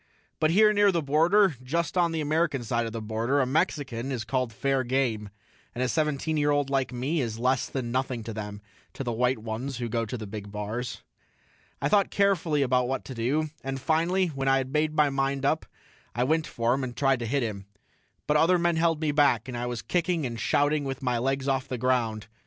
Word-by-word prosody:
But 155 - +3
here 210 +5 +5
near 205 -1 +4
the 170 -3 0
border, 165 +5 +4
just 160 +6 -2
on 175 -2 +3
the 160 -1 -1
American 150 -3 0
side 115 0 -1
of - - -5
the 115 0 -5
border, 115 +6 0
a 130 - +3
Mexican 135 -4 -1
is 120 -4 -2
called 125 +1 -1
fair 135 +4 0
game, 120 -5 -1 0.5
and 125 - -1
a - - +1
seventeen 155 +2 0
year 145 0 +2
old 145 -1 +1
like 135 -1 0
me 135 +6 -1
is 115 -3 -3
less 125 +2 +1
than 125 -3 -3
nothing 130 -2 -1
to 115 0 -6
them, 105 -1 -6 0.3
to - - -5
the 120 - -2
white 125 +2 +1
ones 115 +4 -5
who 120 -1 -3
go 115 +1 -1
to 125 - -4
the 110 - -6
big 100 0 -7
bars. 105 +4 -4 0.8
I - - +3
thought 205 -2 +3
carefully 170 -7 +2
about 125 -1 +2
what 135 +1 -3
to 130 - -7
do, 140 +6 -1
and 135 0 -3
finally 170 +6 +1
when 135 -3 -3
I 135 0 +5
had 130 0 -3
made 155 0 +1
my 150 -2 +3
mind 135 0 -1
up 155 +3 +1 0.5
I 120 - +1
went 155 +4 +1
for 115 +1 0
him 135 +1 -1
and 125 -1 -5
tried 135 -2 +2
to 120 - -3
hit 135 +2 0
him. 100 -4 -5 0.6
But 150 - +3
other 175 +4 +4
men 170 -1 +1
held 165 -1 +2
me 155 -2 +1
back, 140 -6 +3
and 130 - -5
I 120 +1 -3
was 120 -1 -4
kicking 175 -3 0
and 115 -2 -4
shouting 145 +4 +2
with 135 -1 -5
my 125 -2 +1
legs 135 +2 -1
off 135 -1 0
the 130 - -3
ground. 115 -3 0
135 Hz, 225 wpm, -27 LUFS, 120-155 Hz, 0.8 s, here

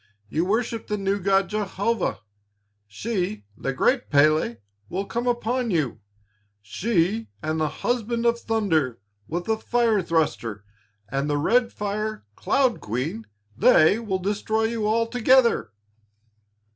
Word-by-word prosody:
You 160 +9 0
worship 225 +3 -1
the 210 - -1
new 195 0 0
God 195 0 +2
Jehovah. 210 - -1 0.7
She, 175 - -3
the 135 - -3
great 245 - +1
Pélé, 150 -4 +3 0.3
will 195 +3 -2
come 235 +4 -3
upon 240 0 0
you, 150 - 0 0.6
she 185 - 0 0.2
and 155 +1 -1
the 155 -1 +1
Husband 235 -1 -2
of 235 0 +3
Thunder, 165 - 0 0.3
with 175 +2 -3
the 220 0 +1
Fire 230 -3 +1
Thruster, 120 - -1 0.4
and 135 +4 -1
the 145 - +1
Red 235 +10 +2
Fire 210 - -3
Cloud 260 -4 +1
Queen, 140 - -4 0.3
they 160 - +5
will 210 -5 -2
destroy 210 +3 -1
you 225 -1 0
altogether." 230 - +3
205 Hz, 125 wpm, -24 LUFS, 155-230 Hz, 0.7 s, they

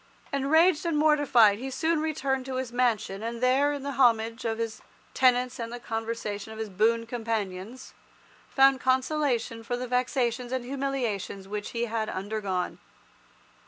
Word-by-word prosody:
Enraged 310 +5 +3
and 335 -3 0
mortified, 285 -9 +4
he 265 +2 -4
soon 320 +4 0
returned 275 -4 -1
to 260 - -4
his 255 -2 -3
mansion, 225 -5 0
and 230 +1 -4
there, 260 +4 +3
in 285 -2 -4
the 280 - -3
homage 230 -4 +2
of 225 -1 -1
his 225 -1 -4 0.3
tenants 250 0 +2
and 230 0 -4
the 240 - -6
conversation 225 -2 -4
of 220 - -9
his 220 -1 -4
boon 225 +4 +2
companions, 225 -1 -4 0.6
found 270 -1 +5
consolation 260 -3 0
for 245 +2 -2
the 250 - -4
vexations 250 -1 0
and 260 -2 -2
humiliations 250 -8 -3
which 205 +1 -4
he 235 0 -2
had 220 -1 -2
undergone. 195 -2 -3
245 Hz, 155 wpm, -27 LUFS, 220-265 Hz, 0.6 s, found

